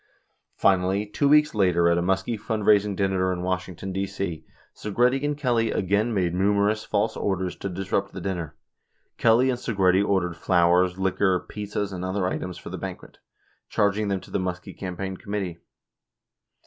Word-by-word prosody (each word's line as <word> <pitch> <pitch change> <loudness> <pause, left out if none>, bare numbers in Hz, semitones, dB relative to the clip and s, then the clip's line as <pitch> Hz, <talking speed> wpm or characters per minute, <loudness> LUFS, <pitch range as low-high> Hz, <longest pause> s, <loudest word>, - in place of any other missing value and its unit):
25 95 -2 +5
Finallv, 100 +3 -2
two 140 - +2
weeks 150 +1 +5
later 90 -5 +3
at 85 - +4
a 85 - +1
Muskie 95 +5 0
fundraising 105 -2 +2
dinner 95 -1 +1
in 90 -1 -3
Wash 90 0 -1
ington, 95 +1 -7
D.C.. 95 -4 -3 0.3
Segretti 125 +6 +1
and 145 0 -1
Kelly 120 -5 +1
again 100 +5 +1
made 90 -5 0
numerous 100 +3 +2
false 105 +2 0
orders 95 -2 -2
to 100 - -4
disrupt 95 +2 -2
the - - -7
dinner. 90 -4 -4 0.6
Kelly 120 +3 +4
and 125 - -3
Segretti 95 -5 +2
ordered 95 -4 0
flowers, 90 +1 +3
liquor, 95 -1 +1
pizzas 105 -1 -4
and 90 -1 -5
other 95 +1 -1
items 90 -1 -3
for - - -9
the - - -5
banquet, - - -8 0.5
charging 100 +1 +1
them 95 -2 -1
to - - -15
the - - 0
Muskie 90 -1 -4
campaign 95 0 -5
committee. 95 -5 -4
95 Hz, 165 wpm, -25 LUFS, 90-105 Hz, 0.6 s, 25